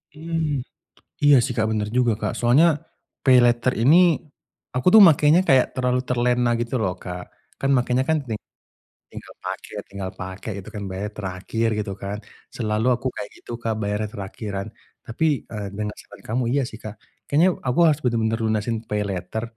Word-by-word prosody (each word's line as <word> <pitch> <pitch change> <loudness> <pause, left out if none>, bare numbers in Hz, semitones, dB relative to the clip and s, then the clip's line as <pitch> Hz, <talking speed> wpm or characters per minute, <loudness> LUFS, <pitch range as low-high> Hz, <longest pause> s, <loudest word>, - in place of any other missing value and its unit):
Mmm. 155 -4 -2 0.6
Iya 145 -1 +7
sih 130 - -3
Kak 110 -1 +2
bener 105 -1 -1
juga 120 -2 +3
Kak. - - -1
Soalnya 125 +8 +5 0.6
paylater 125 -1 +4
ini, 140 +7 +6 0.8
aku 125 +7 -1
tuh 220 - +10
makainya 150 +3 +4
kayak 130 -2 +5
terlalu 125 0 +1
terlena 125 0 +2
gitu 120 +2 -3
loh 90 -3 0
Kak. 90 -1 -6 0.4
Kan 135 - 0
makainya 125 +1 +1
kan 160 - +3
ting 110 -2 -3 0.7
tinggal - - -10
pakai - - -6 0.2
tinggal 100 -1 -5
pakai 95 +4 -7
gitu 110 - -10
kan 105 - -4
bayarnya 100 +3 -5
terakhir 100 +4 -2
gitu 105 -2 -3
kan. 100 +1 -4 0.4
Selalu 110 0 -1
aku 125 - -4
kayak - - -6
gitu - - -12
Kak 115 -1 0
bayarnya 105 +1 -2
terakhiran. 100 0 -5 0.4
Tapi, 115 +8 -2 0.3
eee, 105 -3 -4
dengan 105 0 -3
saran - - -15
kamu 125 +3 0
iya 140 - +2
sih 110 - -11
Kak. 110 0 -7 0.3
Kayaknya 165 +6 +4 0.2
aku 125 +6 +1
harus 150 -1 +2
bener-bener 115 -2 +1
lunasin 110 +1 0
paylater 100 0 -3
115 Hz, 165 wpm, -23 LUFS, 105-130 Hz, 0.8 s, tuh